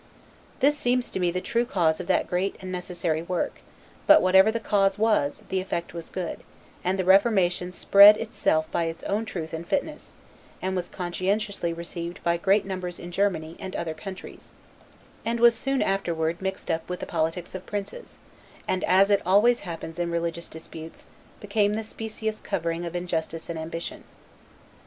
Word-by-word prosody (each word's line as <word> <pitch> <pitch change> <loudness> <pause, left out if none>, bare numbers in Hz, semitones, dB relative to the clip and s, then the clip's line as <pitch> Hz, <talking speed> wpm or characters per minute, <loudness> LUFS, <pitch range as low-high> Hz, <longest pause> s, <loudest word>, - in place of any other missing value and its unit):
This 290 +2 +5
seems 250 -3 0
to - - -3
me 180 -1 +2
the 180 +1 -2
true 235 +5 +1
cause 170 -9 +1
of 180 - -6
that - - +2
great 185 +2 -1
and 185 -1 -7
necessary, 175 -3 -2
work; 175 +1 -3 0.5
but - - +9
whatever 190 +3 +5
the 230 - -2
cause 195 -3 +2
was, 210 -10 +1
the 190 - 0
effect 170 -3 -4
was 170 -1 -7
good; 180 -3 -4 0.4
and 185 +2 0
the 185 - -1
Reformation 190 -3 +3
spread 200 +3 +8
itself 215 -8 0
by 170 - 0
its 165 0 -5
own 210 +3 -1
truth 165 -7 -6
and 160 +1 -4
fitness; 300 +2 -3 0.5
was 185 -1 -2
conscientiously 185 +1 -2
received 170 +1 -6
by 170 0 +2
great 195 +3 +2
numbers 185 -2 -4
in 175 - -8
Germany, 175 -4 0
and 185 - -6
other 165 -2 -3
countries; 185 +4 -10 0.7
and 230 +1 -1
was 235 0 +7
soon 270 +4 0
afterward 170 -3 -1
mixed 190 -2 -3
up 160 +1 -3
with 180 - -3
the - - -4
politics 165 +1 -2
of 185 -1 -7
princes; 205 - -6 0.5
and, 185 - 0
as 195 +2 +4
it 200 - +4
always 210 +7 +4
happens 165 -2 -7
in 175 -1 0
religious 170 0 -2
disputes, 160 0 -10 0.3
became 205 0 +1
the 220 - -2
specious 220 0 -5
covering 170 +1 -2
of 170 - -7
injustice 165 -2 -3
and 165 - -5
ambition. 165 +1 -6
185 Hz, 170 wpm, -26 LUFS, 170-205 Hz, 0.7 s, but